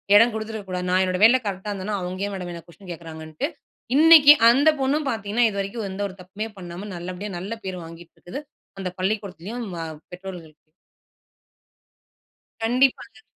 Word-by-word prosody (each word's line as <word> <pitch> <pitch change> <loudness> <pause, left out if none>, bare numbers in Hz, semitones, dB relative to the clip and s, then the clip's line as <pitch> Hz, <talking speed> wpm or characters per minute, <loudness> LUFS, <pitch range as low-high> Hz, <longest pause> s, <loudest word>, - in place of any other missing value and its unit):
இடம் 230 +3 +7
குடுத்திருக்க 220 -1 -5
கூடாது. 180 0 -3
நான் 185 +1 +3
என்னோட 185 0 -1
வேலையில 245 +4 +7
கரெக்ட்டா 195 0 -4
இருந்தேன்னா, 200 +1 -3
அவங்க 180 +2 -5
ஏன்? 205 - -4
மேடம் 180 -2 -5
என்ன 170 - -8
குவெஸ்சன் 180 +2 -15
கேட்கிறாங்கன்ட்டு," 160 - -5 0.5
இன்னைக்கு 305 -1 +9 0.2
அந்த 280 +6 +5
பொண்ணும் 285 +2 +1
பாத்தீங்கன்னா 220 0 +1
இதுவரைக்கும் 200 +2 -4
எந்த 190 +1 -5
ஒரு 190 - -10
தப்புமே 200 +4 -6
பண்ணாம 180 +2 -8
நல்லபடியா 180 +4 -6
நல்ல 195 +6 -5
பேர் 185 -1 -4
வாங்கிட்டு 165 +1 -12
இருக்கு. 180 +11 -7 0.4
அந்த 190 -1 -3
பள்ளிக்கூடத்திலயும், 200 +3 -3
வ - - -5 0.3
பெற்றோர்கள்ட்டயும். 175 -5 -10 1.9
கண்டிப்பாங்க. 250 +2 +1
195 Hz, 150 wpm, -24 LUFS, 180-225 Hz, 1.9 s, இன்னைக்கு